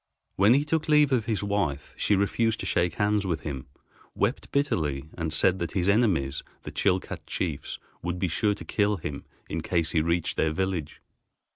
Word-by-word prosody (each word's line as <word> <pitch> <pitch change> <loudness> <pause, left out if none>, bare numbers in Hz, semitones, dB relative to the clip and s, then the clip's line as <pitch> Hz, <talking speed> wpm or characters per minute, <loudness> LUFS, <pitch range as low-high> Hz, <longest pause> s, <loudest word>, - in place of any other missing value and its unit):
When 100 +6 +6
he 145 +2 +2
took 160 0 0
leave 150 -2 +5
of 120 -4 +2
his 110 -4 -1
wife, 95 -9 -1
she 105 - +2
refused 110 +3 +1
to - - -4
shake 85 0 +1
hands 105 -1 +1
with 80 -5 -1
him, 70 -4 -5 0.5
wept - - -1
bitterly, 75 - 0
and 80 -2 -2
said 90 +4 +3
that 85 -2 -3
his 90 -1 0
enemies, 100 - +2 0.2
the - - -6
Chilcat 95 -2 -1
chiefs, 80 -6 -3 0.2
would 85 +1 -2
be 95 - 0
sure 105 +5 +1
to - - -10
kill 105 -1 +1
him 75 -4 -6 0.2
in 80 - -3
case 85 -1 0
he 80 - +3
reached 85 +1 0
their 80 -1 +2
village. 95 -3 -2
95 Hz, 185 wpm, -27 LUFS, 80-105 Hz, 0.5 s, When